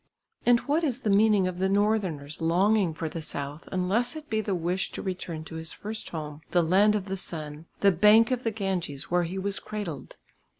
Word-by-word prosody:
And 240 -1 +5
what 300 +4 0
is 260 -4 -1
the 210 - +1
meaning 205 -1 +4
of 180 -1 -4
the 190 +1 +1
northerner's 195 -8 0
longing 185 +3 +3
for 165 - -3
the 160 +1 -5
south 145 0 -5
unless 205 +9 0
it 305 -4 -9
be 220 0 +1
the 200 -2 -1
wish 175 +2 -1
to - - -5
return 180 -4 -4
to 160 0 -8
his 160 0 -5
first 215 +1 -6
home, 150 -2 -6
the 175 -1 +3
land 200 +6 +4
of 200 -3 -2
the 195 -1 -3
sun, 155 -2 -4
the 200 - +6
bank 210 +6 +5
of 255 0 -1
the 225 - +1
Ganges 190 -10 -3
where 175 0 +2
he 180 +3 -5
was 195 +1 -1
cradled? 205 -10 -6
190 Hz, 210 wpm, -27 LUFS, 165-215 Hz, -, the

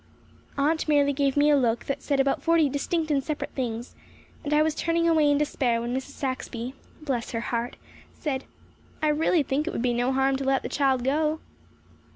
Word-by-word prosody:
Aunt 310 +4 +1
merely 285 -2 +3
gave 275 0 0
me 295 +1 +5
a - - +6
look 240 -4 +1
that 275 0 -3
said 280 -1 0
about 270 0 +2
forty 330 -2 +3
distinct 310 +3 -1
and 275 -2 +1
separate 305 0 -4
things, 240 -2 -4 0.5
and 295 - -4
I 300 +1 +4
was 315 0 +1
turning 335 +2 0
away 315 -3 +4
in 290 - +3
despair 260 -5 0
when 240 +2 -3
Mrs. 265 +2 -5
Saxby 255 -2 -4 0.3
bless 250 -6 -2
her 230 - -1
heart 235 +1 -3 0.4
said: 275 -4 -3 0.6
"I 305 - +4
really 310 +1 +2
think 285 +4 -1
it - - -2
would 230 - -2
be 245 -1 +2
no 245 +2 +1
harm 270 0 +2
to 275 - -4
let 270 0 +1
the - - -4
child 265 -3 +1
go." 305 +4 +1
275 Hz, 200 wpm, -26 LUFS, 260-300 Hz, 0.6 s, a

